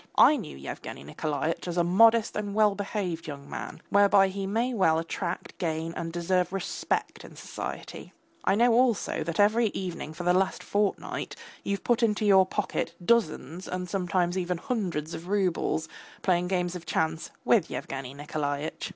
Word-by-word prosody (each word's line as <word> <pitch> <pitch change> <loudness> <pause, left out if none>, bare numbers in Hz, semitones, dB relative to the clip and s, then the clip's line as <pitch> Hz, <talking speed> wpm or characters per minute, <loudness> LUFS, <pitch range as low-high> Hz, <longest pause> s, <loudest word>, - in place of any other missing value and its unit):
I 305 - +8
knew 215 - -6
Yevgeny 70 0 -7
Nikolaitch 150 - -2
as 175 0 -3
a 175 - +4
modest 225 +5 +5
and 205 -1 -3
well 215 -1 +5
behaved 195 -5 -3
young 140 -2 -7
man, - - -7
whereby 200 -1 +5
he 195 0 -4
may 230 +5 0
well 175 -7 +3
attract, 170 +2 -4
gain 165 -1 -2
and 165 0 -4
deserve 180 +2 0
respect 195 -2 -2
in - - -12
society. - - -7 0.3
I - - +3
know 235 +2 +4
also 235 -9 +2
that 170 +3 -4
every 220 +3 +4
evening 175 -4 -4
for 175 - -5
the 180 0 +3
last 190 +1 +1
fortnight 205 -1 -1 0.3
you've 200 0 -2
put 240 0 +2
into 215 -2 +2
your 190 -2 +6
pocket - - -2
dozens 180 - +1
and 180 0 -3
sometimes 180 0 0
even 180 -1 -1
hundreds 175 - -2
of 170 - -7
roubles, 185 -5 0 0.4
playing 180 -1 +2
games 180 -1 -1
of 175 -2 -8
chance 160 0 -1 0.2
with 210 -8 +4
Yevgeny 135 -1 -5
Nikolaitch. 145 +1 -3
180 Hz, 165 wpm, -28 LUFS, 165-205 Hz, 0.4 s, I